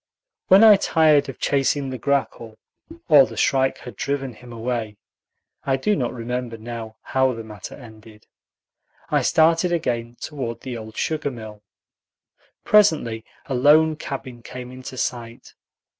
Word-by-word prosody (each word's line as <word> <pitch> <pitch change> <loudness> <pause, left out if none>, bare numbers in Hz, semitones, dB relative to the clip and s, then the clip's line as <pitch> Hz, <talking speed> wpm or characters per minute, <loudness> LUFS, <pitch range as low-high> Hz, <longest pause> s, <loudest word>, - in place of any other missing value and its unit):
When 195 +3 +7
I 215 -2 +9
tired 155 -6 +3
of 135 - -8
chasing 135 0 0
the 130 - -6
grackle, 115 -4 -2 0.5
or 145 -6 +7
the 115 0 -11
shrike 135 +3 +2
had 125 -4 -11
driven 135 +2 -3
him 120 +2 -14
away 115 -2 -4 0.7
(I 135 -1 +1
do 210 +10 +1
not 125 -4 -1
remember 125 -1 -4
now 115 -1 -7
how 130 -1 +1
the 115 -1 -7
matter 105 -3 -9
ended), 110 -3 -15 0.9
I - - +3
started 165 +2 +3
again 120 -8 -2
toward 130 -6 -5
the 130 -2 -6
old 110 -1 -9
sugar 155 -2 -1
mill. 110 -5 -10 1.0
Presently 155 - +3 0.2
a 135 - -4
lone 155 +5 +4
cabin 135 -5 -7
came 125 +1 -9
into 130 0 -9
sight. 120 -2 -5
125 Hz, 145 wpm, -22 LUFS, 115-145 Hz, 1.0 s, I